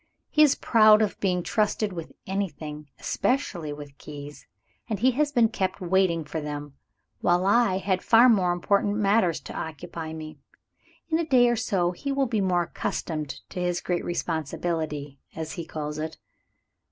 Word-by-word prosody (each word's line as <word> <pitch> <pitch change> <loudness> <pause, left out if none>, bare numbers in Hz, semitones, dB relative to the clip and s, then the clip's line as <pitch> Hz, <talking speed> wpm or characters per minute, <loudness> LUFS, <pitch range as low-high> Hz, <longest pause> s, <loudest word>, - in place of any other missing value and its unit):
He 305 - +4
is 300 -3 +6
proud 215 -1 +6
of 210 - -2
being 180 -3 0
trusted 210 -1 0
with 165 -2 -7
anything, 155 -6 -4
especially 175 - -1
with 145 -1 -9
keys; 145 -1 -10 0.4
and 215 - -1
he 250 +6 +3
has 290 +3 +1
been 235 -4 +4
kept 190 -3 -2
waiting 180 -2 +2
for 155 +2 -4
them, 145 -1 -6 0.5
while 175 +1 +2
I 205 -2 +4
had 190 -1 0
far 235 +2 +6
more 190 -7 +4
important 200 +3 +1
matters 200 -4 +2
to - - -9
occupy 160 +1 -6
me. 155 -2 -8 0.7
In 320 0 +2
a - - +1
day 255 -6 +4
or 240 - +2
two 180 -5 0
he 275 +10 -4
will 275 0 +1
be 225 -4 0
more 180 -2 +2
accustomed 155 -3 -4
to 180 - -5
his 175 -1 0
great 175 -1 -2
responsibility, 155 -3 -3 0.2
as 160 -1 -4
he 170 - -5
calls 150 -1 -5
it." 160 +1 -4
180 Hz, 165 wpm, -26 LUFS, 155-215 Hz, 0.7 s, is